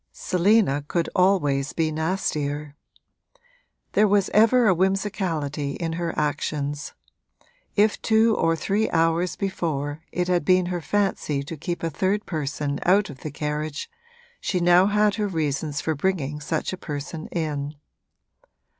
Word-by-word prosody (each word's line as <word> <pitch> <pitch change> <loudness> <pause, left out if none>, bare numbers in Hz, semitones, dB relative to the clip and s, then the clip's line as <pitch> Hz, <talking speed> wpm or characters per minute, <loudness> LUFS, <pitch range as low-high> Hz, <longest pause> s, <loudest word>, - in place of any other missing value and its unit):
Selina 180 -6 +2
could 170 +1 -1
always 145 -7 +2
be 160 -1 0
nastier. 150 -3 -2 1.2
There 210 - +4
was 200 -1 +2
ever 230 +2 +5
a 190 - +6
whimsicality 175 -6 -1
in 165 +1 -3
her 170 0 -2
actions: 145 0 -2 0.8
if 210 +1 +3
two 220 0 +4
or 165 0 +2
three 200 +7 0
hours 165 +2 +1
before 155 -6 -2
it 180 0 -1
had 180 -2 +2
been 185 +2 +4
her 175 - -2
fancy 175 -7 0
to 155 +4 -7
keep 170 +3 -4
a 165 - -1
third 195 +6 0
person 145 -3 -3
out 200 +3 +3
of 130 - -12
the 155 - -5
carriage 150 - -4 0.5
she 185 - -1
had 175 - 0
now 175 +2 +6
her 210 0 +2
reasons 150 -4 -2
for 160 - 0
bringing 150 -3 -1
such 160 +4 -2
a - - -4
person 150 +2 -5
in. 150 -3 -3
165 Hz, 140 wpm, -24 LUFS, 150-190 Hz, 1.2 s, a